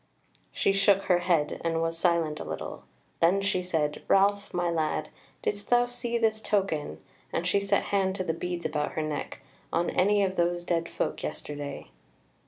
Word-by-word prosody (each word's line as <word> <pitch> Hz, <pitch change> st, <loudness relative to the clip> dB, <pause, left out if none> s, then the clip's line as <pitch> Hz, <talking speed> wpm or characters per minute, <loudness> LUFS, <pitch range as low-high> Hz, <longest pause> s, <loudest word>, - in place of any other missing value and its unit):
She 195 Hz, -, +2 dB
shook 195 Hz, 0 st, +4 dB
her 180 Hz, -2 st, +3 dB
head, 170 Hz, -4 st, +1 dB
and 165 Hz, -1 st, 0 dB
was 165 Hz, 0 st, 0 dB
silent 165 Hz, -3 st, +1 dB
a -, -, -4 dB
little; -, -, -6 dB, 0.3 s
then 175 Hz, +4 st, +4 dB
she 195 Hz, -2 st, 0 dB
said: 160 Hz, -5 st, -1 dB
"Ralph, 200 Hz, +1 st, +3 dB
my 175 Hz, -1 st, 0 dB
lad, 155 Hz, -2 st, -1 dB, 0.3 s
didst 205 Hz, 0 st, -2 dB
thou 245 Hz, 0 st, +5 dB
see 240 Hz, -1 st, -2 dB
this 220 Hz, -1 st, +1 dB
token 195 Hz, -9 st, -1 dB, 0.3 s
(and 170 Hz, -, -1 dB
she 200 Hz, -, +3 dB
set 200 Hz, 0 st, +1 dB
hand 190 Hz, -1 st, +2 dB
to 185 Hz, -, -2 dB
the 165 Hz, -, -1 dB
beads 175 Hz, +1 st, -4 dB
about 150 Hz, -1 st, -1 dB
her 155 Hz, -, -1 dB
neck) 150 Hz, -2 st, -4 dB, 0.3 s
on 170 Hz, -, +1 dB
any 205 Hz, +2 st, +3 dB
of 190 Hz, -1 st, -1 dB
those 175 Hz, 0 st, +1 dB
dead 170 Hz, -1 st, -1 dB
folk -, -, -2 dB
yesterday?" 145 Hz, -, -6 dB
175 Hz, 180 wpm, -28 LUFS, 165-200 Hz, 0.3 s, thou